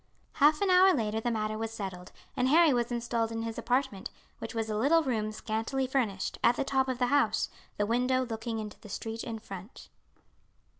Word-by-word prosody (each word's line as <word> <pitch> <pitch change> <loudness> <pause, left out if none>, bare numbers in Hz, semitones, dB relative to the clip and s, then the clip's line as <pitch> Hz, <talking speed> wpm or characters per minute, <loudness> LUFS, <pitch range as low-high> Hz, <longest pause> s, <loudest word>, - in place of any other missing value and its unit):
Half 300 +3 +4
an 395 -2 +3
hour 370 +1 +6
later 220 -3 -1
the 240 - 0
matter 215 -1 -2
was 225 0 -2
settled, 190 -5 -7 0.2
and 255 -2 +1
Harry 320 +1 +6
was 240 0 0
installed 235 -1 -1
in 225 0 -3
his 230 0 -4
apartment, 245 -4 -1 0.3
which - - -6
was 225 -1 -1
a 215 - -2
little 295 +9 +3
room 220 -6 -1
scantily 225 +5 -2
furnished, 235 -8 -1
at 240 - +5
the - - 0
top 265 -1 +1
of 260 -1 -2
the 250 - +2
house, 285 - +2 0.3
the 205 - +1
window 250 +3 +1
looking 225 -1 -4
into 215 -1 -6
the 210 - -13
street 225 +3 -5
in 230 -2 -5
front. 200 0 -10
230 Hz, 200 wpm, -30 LUFS, 220-260 Hz, 0.3 s, hour